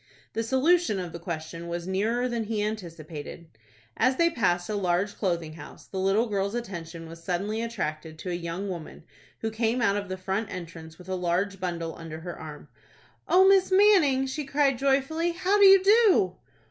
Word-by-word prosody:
The 225 Hz, -, -1 dB
solution 265 Hz, -, +2 dB
of 175 Hz, -3 st, -6 dB
the 170 Hz, -, -6 dB
question 165 Hz, 0 st, -6 dB
was 170 Hz, 0 st, -4 dB
nearer 225 Hz, +6 st, 0 dB
than 235 Hz, -2 st, -2 dB
he 210 Hz, -1 st, -1 dB
anticipated. 170 Hz, -6 st, -6 dB, 0.5 s
As 255 Hz, +3 st, +2 dB
they 335 Hz, +4 st, +3 dB
passed 175 Hz, -, 0 dB
a 215 Hz, -, -3 dB
large 190 Hz, 0 st, 0 dB
clothing 170 Hz, -5 st, -2 dB
house, 165 Hz, -, -12 dB
the 190 Hz, -, -6 dB
little 195 Hz, +5 st, +2 dB
girl's 200 Hz, -1 st, -2 dB
attention 170 Hz, -8 st, -6 dB
was 165 Hz, +1 st, -11 dB
suddenly 200 Hz, +5 st, -2 dB
attracted 160 Hz, -9 st, -4 dB
to 180 Hz, +3 st, -5 dB
a -, -, -2 dB
young 175 Hz, +3 st, -4 dB
woman, 170 Hz, -4 st, -7 dB, 0.4 s
who 225 Hz, -, -2 dB
came 225 Hz, +2 st, 0 dB
out 205 Hz, -4 st, +2 dB
of 200 Hz, -2 st, -4 dB
the 185 Hz, -, -4 dB
front 195 Hz, +3 st, -2 dB
entrance 165 Hz, -2 st, -8 dB
with 180 Hz, -, -14 dB
a 190 Hz, -, -3 dB
large 185 Hz, +2 st, -1 dB
bundle 170 Hz, -3 st, -3 dB
under 160 Hz, -1 st, -8 dB
her 175 Hz, 0 st, -6 dB
arm. 150 Hz, -1 st, -10 dB, 0.6 s
"O 375 Hz, +2 st, +6 dB
Miss 385 Hz, -1 st, +4 dB
Manning," 370 Hz, -10 st, +5 dB
she 270 Hz, +3 st, -4 dB
cried, 275 Hz, -2 st, +1 dB
joyfully, 280 Hz, +5 st, +1 dB
"how 370 Hz, +4 st, +1 dB
do 400 Hz, -, +8 dB
you 385 Hz, -1 st, +8 dB
do?" 415 Hz, -2 st, +4 dB
200 Hz, 185 wpm, -27 LUFS, 170-260 Hz, 0.6 s, do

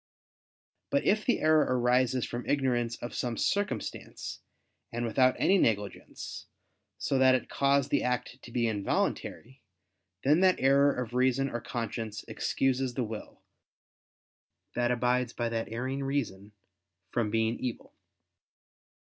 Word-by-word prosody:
But 280 Hz, -1 st, +1 dB
if 215 Hz, +1 st, +2 dB
the 245 Hz, -, +2 dB
error 155 Hz, 0 st, +5 dB, 0.2 s
arise 125 Hz, 0 st, +2 dB
from 120 Hz, +1 st, -5 dB
ignorance 120 Hz, -4 st, +1 dB
of 120 Hz, -, -5 dB
some 120 Hz, -2 st, -2 dB
circumstance, 205 Hz, 0 st, -2 dB, 0.5 s
and 120 Hz, +1 st, -2 dB
without 130 Hz, +3 st, +3 dB
any 195 Hz, 0 st, +4 dB
negligence, 105 Hz, -, -2 dB, 0.5 s
so 135 Hz, -, 0 dB
that 130 Hz, 0 st, +6 dB
it 130 Hz, -, -3 dB
cause 140 Hz, 0 st, +2 dB
the -, -, +2 dB
act 125 Hz, +1 st, -2 dB
to 120 Hz, -, -12 dB
be 120 Hz, -1 st, +1 dB
involuntary, 115 Hz, +4 st, -2 dB, 0.6 s
then 150 Hz, +5 st, +4 dB
that 185 Hz, -1 st, +4 dB
error 140 Hz, +2 st, +5 dB
of 125 Hz, -3 st, -4 dB
reason 130 Hz, +2 st, +2 dB
or 120 Hz, -, -3 dB
conscience 115 Hz, -3 st, -4 dB
excuses 130 Hz, -1 st, 0 dB
the 130 Hz, -, 0 dB
will, 110 Hz, -1 st, -8 dB, 1.3 s
that 120 Hz, 0 st, +1 dB
abides 125 Hz, 0 st, +1 dB
by 120 Hz, -1 st, -1 dB
that 115 Hz, -1 st, -3 dB
erring 130 Hz, +4 st, -3 dB
reason, 110 Hz, -8 st, -3 dB, 0.6 s
from 115 Hz, -3 st, 0 dB
being 115 Hz, +1 st, 0 dB
evil. 125 Hz, -3 st, -5 dB
125 Hz, 130 wpm, -29 LUFS, 115-135 Hz, 1.3 s, that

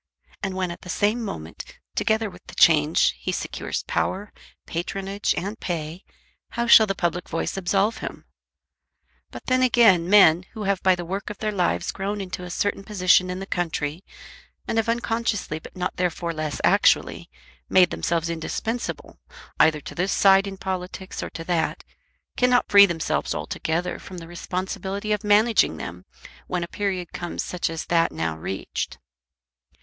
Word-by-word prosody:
And 195 Hz, -2 st, -3 dB
when 185 Hz, -2 st, -1 dB
at 170 Hz, -, -9 dB
the 180 Hz, -, -11 dB
same 210 Hz, +6 st, +1 dB
moment, 80 Hz, -, -7 dB, 0.2 s
together 220 Hz, 0 st, +1 dB
with 180 Hz, -2 st, -12 dB
the -, -, -11 dB
change, 155 Hz, -1 st, +4 dB
he -, -, -2 dB
secures -, -, -4 dB
power, 205 Hz, +2 st, -2 dB, 0.3 s
patronage, 195 Hz, +4 st, -2 dB
and 205 Hz, +5 st, -4 dB
pay, 165 Hz, 0 st, -4 dB, 0.5 s
how 235 Hz, 0 st, 0 dB
shall 220 Hz, -2 st, +8 dB
the 195 Hz, -, -1 dB
public 175 Hz, 0 st, -2 dB
voice 165 Hz, -, -2 dB
absolve 195 Hz, +4 st, +1 dB
him? -, -, -7 dB, 1.0 s
But -, -, -10 dB
then 255 Hz, 0 st, +2 dB
again 225 Hz, -9 st, +5 dB
men, 185 Hz, -4 st, +6 dB
who 220 Hz, -2 st, -5 dB
have 195 Hz, -1 st, 0 dB
by 185 Hz, -1 st, +4 dB
the 175 Hz, -1 st, -6 dB
work 195 Hz, +5 st, -4 dB
of 210 Hz, -, -7 dB
their 215 Hz, -1 st, -2 dB
lives 180 Hz, -4 st, 0 dB
grown 200 Hz, +2 st, -3 dB
into 180 Hz, -2 st, -5 dB
a 180 Hz, -, -7 dB
certain 200 Hz, +2 st, -1 dB
position 185 Hz, -3 st, +3 dB
in 180 Hz, -, -3 dB
the 195 Hz, -, -5 dB
country, 165 Hz, -2 st, -2 dB, 0.6 s
and 225 Hz, -, +1 dB
have 225 Hz, -, -1 dB
unconsciously 230 Hz, -8 st, -1 dB
but -, -, -13 dB
not 180 Hz, -, -3 dB
therefore 175 Hz, -1 st, -1 dB
less 155 Hz, -2 st, -3 dB
actually -, -, +3 dB, 0.4 s
made 180 Hz, -2 st, +5 dB
themselves 165 Hz, -1 st, -1 dB
indispensable 170 Hz, +8 st, -4 dB, 0.4 s
either 155 Hz, -1 st, +4 dB
to -, -, -8 dB
this 185 Hz, +3 st, -1 dB
side 195 Hz, -1 st, +5 dB
in 195 Hz, -1 st, -6 dB
politics 185 Hz, 0 st, -5 dB
or -, -, -4 dB
to 165 Hz, -, -7 dB
that, 165 Hz, -1 st, -1 dB, 0.5 s
cannot 250 Hz, 0 st, +3 dB
free 200 Hz, 0 st, +9 dB
themselves 165 Hz, -3 st, -1 dB
altogether 170 Hz, +3 st, -2 dB
from 185 Hz, -, -10 dB
the 165 Hz, -1 st, -8 dB
responsibility 190 Hz, +4 st, -4 dB
of 210 Hz, -1 st, 0 dB
managing 215 Hz, +2 st, +4 dB
them -, -, -7 dB, 0.4 s
when 180 Hz, -1 st, -2 dB
a -, -, -4 dB
period 185 Hz, -3 st, -3 dB
comes 175 Hz, -1 st, -4 dB
such 180 Hz, -2 st, -2 dB
as 165 Hz, -1 st, -5 dB
that 170 Hz, -1 st, +2 dB
now 80 Hz, -1 st, -2 dB
reached. 95 Hz, +4 st, -4 dB
185 Hz, 165 wpm, -24 LUFS, 170-205 Hz, 1.0 s, free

